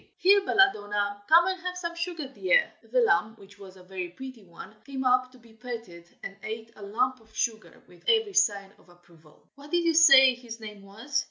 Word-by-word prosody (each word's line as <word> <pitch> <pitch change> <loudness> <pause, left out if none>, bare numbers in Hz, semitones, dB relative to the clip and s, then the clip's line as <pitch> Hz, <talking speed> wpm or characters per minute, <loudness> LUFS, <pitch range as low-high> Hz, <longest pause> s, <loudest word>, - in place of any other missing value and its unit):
here, 400 +2 +4
Belladonna, 205 - +1
come 340 +3 +6
and 375 -1 -3
have 360 0 -5
some 340 -1 -5
sugar, 340 -4 -5
dear!" 485 - +2 0.2
The - - +3
lamb, 310 - +1
which 200 0 -18
was 190 -1 -13
a 185 - -16
very 180 -1 -6
pretty 255 +4 -11
one, 175 +3 -13
came 270 -1 -6
up 255 0 +2
to 255 - -18
be 230 -2 -20
petted, 225 -8 -9 0.2
and 195 - -7
ate 220 +1 -7
a - - -15
lump 245 +5 -2
of 220 0 -24
sugar 220 -2 -4
with - - -20
every 445 -3 +2
sign 205 - +1
of - - -25
approval. 170 -3 -23
"What 285 +1 -15
did 345 +1 0
you 335 - +2
say 275 -5 +7
his 240 -2 -11
name 210 -2 -10
was?" 225 +9 -4
240 Hz, 205 wpm, -26 LUFS, 205-330 Hz, 0.2 s, say